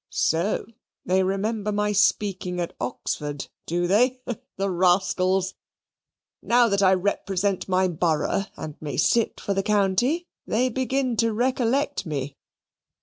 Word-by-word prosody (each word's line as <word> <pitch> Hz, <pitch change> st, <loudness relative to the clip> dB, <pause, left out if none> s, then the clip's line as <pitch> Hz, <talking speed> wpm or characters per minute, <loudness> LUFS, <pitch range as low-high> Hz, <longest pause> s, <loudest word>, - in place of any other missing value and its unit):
So 170 Hz, +6 st, 0 dB, 0.4 s
they 185 Hz, +1 st, +2 dB
remember 205 Hz, +3 st, -1 dB
my 210 Hz, 0 st, 0 dB
speaking 195 Hz, -2 st, +1 dB
at 170 Hz, -, -3 dB
Oxford, 145 Hz, +3 st, -4 dB, 0.2 s
do 175 Hz, +1 st, 0 dB
they? 245 Hz, +8 st, +3 dB, 0.4 s
The 195 Hz, 0 st, 0 dB
rascals! 185 Hz, +1 st, +2 dB, 0.9 s
Now 240 Hz, 0 st, +4 dB
that 200 Hz, 0 st, +1 dB
I 190 Hz, -1 st, +5 dB
represent 195 Hz, 0 st, -1 dB
my 185 Hz, 0 st, +3 dB
borough 170 Hz, +2 st, 0 dB
and 150 Hz, -2 st, -6 dB
may 145 Hz, -5 st, -4 dB
sit 230 Hz, -1 st, +2 dB
for 200 Hz, -, -2 dB
the 195 Hz, -, +1 dB
county, 210 Hz, -, +1 dB, 0.2 s
they 250 Hz, +4 st, +1 dB
begin 260 Hz, 0 st, -1 dB
to 230 Hz, 0 st, +2 dB
recollect 255 Hz, -, 0 dB
me! 140 Hz, -2 st, -4 dB
195 Hz, 130 wpm, -24 LUFS, 180-225 Hz, 0.9 s, I